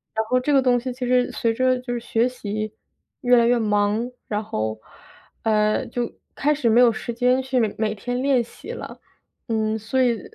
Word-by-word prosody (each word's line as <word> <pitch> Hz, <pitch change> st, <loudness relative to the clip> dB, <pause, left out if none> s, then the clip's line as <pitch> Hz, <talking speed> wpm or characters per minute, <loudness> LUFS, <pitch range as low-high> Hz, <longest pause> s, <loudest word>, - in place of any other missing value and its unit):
然 220 Hz, 0 st, 0 dB
后 255 Hz, -, +2 dB
这 275 Hz, +4 st, -1 dB
个 270 Hz, -, +5 dB
东 250 Hz, -1 st, +3 dB
西 255 Hz, +2 st, -4 dB
其 250 Hz, 0 st, -4 dB
实 250 Hz, 0 st, +2 dB
随 230 Hz, -1 st, 0 dB
着 255 Hz, +1 st, +2 dB
就 250 Hz, -1 st, -5 dB
是 240 Hz, -, -2 dB
学 230 Hz, 0 st, +1 dB
习 215 Hz, -3 st, -4 dB, 0.5 s
越 245 Hz, -1 st, +5 dB
来 235 Hz, -, +5 dB
越 245 Hz, +1 st, +4 dB
忙， 210 Hz, +2 st, +1 dB, 0.2 s
然 210 Hz, 0 st, -2 dB
后， 110 Hz, -, -3 dB, 0.7 s
嗯， 215 Hz, +2 st, +1 dB
就 240 Hz, -1 st, -2 dB, 0.2 s
开 300 Hz, +2 st, +2 dB
始 275 Hz, -5 st, -1 dB
没 235 Hz, +3 st, +5 dB
有 240 Hz, -, +6 dB
时 230 Hz, +1 st, -5 dB
间 250 Hz, +2 st, +2 dB
去 260 Hz, 0 st, -2 dB, 0.2 s
每 215 Hz, -1 st, -1 dB
天 245 Hz, +5 st, -3 dB
练 265 Hz, -3 st, +3 dB
习 235 Hz, -, -11 dB
了， -, -, -8 dB, 0.5 s
嗯， 220 Hz, -1 st, 0 dB
所 225 Hz, +5 st, 0 dB
以 235 Hz, -4 st, +1 dB
235 Hz, 215 characters per minute, -23 LUFS, 220-250 Hz, 0.7 s, 有